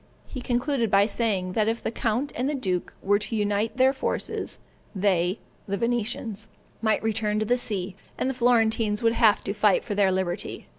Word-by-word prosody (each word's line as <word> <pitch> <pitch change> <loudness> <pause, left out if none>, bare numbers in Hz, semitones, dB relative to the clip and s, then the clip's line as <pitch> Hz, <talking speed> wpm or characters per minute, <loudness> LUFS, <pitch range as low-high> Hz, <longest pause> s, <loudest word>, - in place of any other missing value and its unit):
He 255 - -7
concluded 245 -1 0
by 200 0 +5
saying, 200 -5 -1
that 215 +1 +1
if 225 +1 -1
the - - -1
count 235 +5 -1
and 255 +4 -1
the 300 - -1
duke 185 -9 -2
were 205 +1 +3
to 220 +2 -4
unite 210 +2 0
their 260 +1 +4
forces, 265 - -2 0.4
they 185 -1 +1 0.3
(the 200 0 -1
Venetians) 225 -2 -2 0.3
might 220 -1 +1
return 215 -1 0
to 215 - 0
the 245 - +3
sea, 200 -6 -2 0.2
and - - -1
the 265 - 0
Florentines 225 -3 +2
would 230 0 +4
have 225 -3 +4
to 200 - -2
fight 210 -2 +3
for - - -4
their 200 -2 +3
liberty. 185 -2 -3
220 Hz, 190 wpm, -26 LUFS, 200-235 Hz, 0.4 s, by